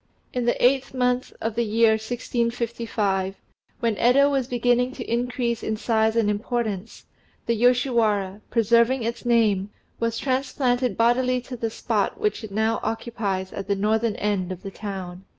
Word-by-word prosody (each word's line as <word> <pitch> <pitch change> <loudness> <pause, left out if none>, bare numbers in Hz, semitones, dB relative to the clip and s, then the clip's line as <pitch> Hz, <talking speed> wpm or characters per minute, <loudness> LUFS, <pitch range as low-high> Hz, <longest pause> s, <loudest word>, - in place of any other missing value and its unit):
In 250 -1 -1
the 240 - +2
eighth 265 +1 +2
month 250 0 0
of 225 0 -1
the 235 +2 0
year 225 +1 +4
1655, 230 -3 -1 0.5
when 230 -3 +1
Yedo 275 +6 +4
was 270 -3 0
beginning 245 +1 +1
to 250 - -6
increase 235 0 -1
in 220 0 -2
size 220 0 +1
and 230 -2 +2
importance, 215 -1 -3 0.4
the 235 - +1
Yoshiwara, 225 -5 +2
preserving 235 +2 +3
its 235 +2 -4
name, 210 -5 +3 0.3
was 230 0 -1
transplanted 255 -3 0
bodily 250 +2 +3
to 250 +1 -8
the 230 -1 -2
spot 225 - -1
which 425 - -1
it 220 - -6
now 220 +2 +1
occupies 210 -5 -3
at 195 -1 -5
the 200 - +1
northern 215 +2 +1
end 200 -3 -1
of 185 -1 -7
the 195 - -6
town. 190 -3 -6
230 Hz, 155 wpm, -24 LUFS, 210-245 Hz, 0.5 s, year